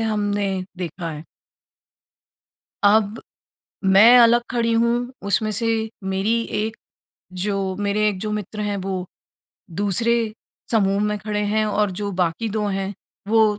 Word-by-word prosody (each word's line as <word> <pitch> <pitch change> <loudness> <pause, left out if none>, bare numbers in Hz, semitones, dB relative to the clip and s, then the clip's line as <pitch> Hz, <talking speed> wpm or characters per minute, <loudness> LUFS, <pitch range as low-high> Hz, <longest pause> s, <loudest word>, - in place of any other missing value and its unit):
हमने 205 -2 0 0.3
देखा 175 -1 -4
है। 155 0 -8 1.6
अब 210 +1 +3 0.6
मैं 210 +6 +8
अलग 235 0 +6
खड़ी 235 -2 +1
हूँ, 235 +2 +1
उसमें 210 +2 +1
से 220 +3 -1 0.4
मेरी 195 +5 0 0.2
एक 220 +1 -3 0.7
जो 195 -2 -1
मेरे 205 +1 0
1 200 -3 -2
जो 215 - -3
मित्र 210 0 -4
हैं 205 -1 -1
वो 190 -2 -3 0.8
दूसरे 205 +4 +2 0.6
समूह 200 -3 +2
में 210 0 0
खड़े 210 +1 -3
हैं 215 0 +2
और 210 -1 +1
जो 205 -1 -2
बाकी 180 +5 -1
2 210 - 0
हैं, 195 0 -2 0.4
वो 215 -1 +3
210 Hz, 135 wpm, -22 LUFS, 195-220 Hz, 1.6 s, मैं